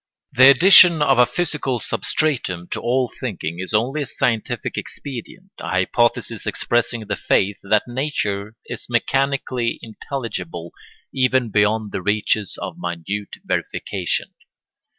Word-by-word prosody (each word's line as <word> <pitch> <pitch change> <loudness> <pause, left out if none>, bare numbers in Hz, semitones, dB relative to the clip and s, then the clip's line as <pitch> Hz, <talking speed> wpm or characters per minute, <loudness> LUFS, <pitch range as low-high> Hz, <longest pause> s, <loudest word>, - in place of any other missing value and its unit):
The 130 +2 +7
addition 170 +2 +7
of 135 -4 +3
a 125 - +6
physical 150 -8 -2
substratum 115 - -1
to - - -4
all 125 +1 +1
thinking 90 - -4
is 95 - -5
only 125 +8 0
a 140 - -3
scientific 115 -3 -1
expedient, 145 +8 -7
a - - -6
hypothesis 100 +6 0
expressing 120 -1 0
the 105 0 -2
faith 100 +1 +1
that 105 +3 +1
nature 110 -6 -3
is - - -6
mechanically 130 -1 0
intelligible 105 - -6 0.4
even 130 -3 +1
beyond 105 +1 +1
the - - -3
reaches 105 0 0
of - - -6
minute 90 +4 -5
verification. - - -2
115 Hz, 125 wpm, -21 LUFS, 105-135 Hz, 0.4 s, The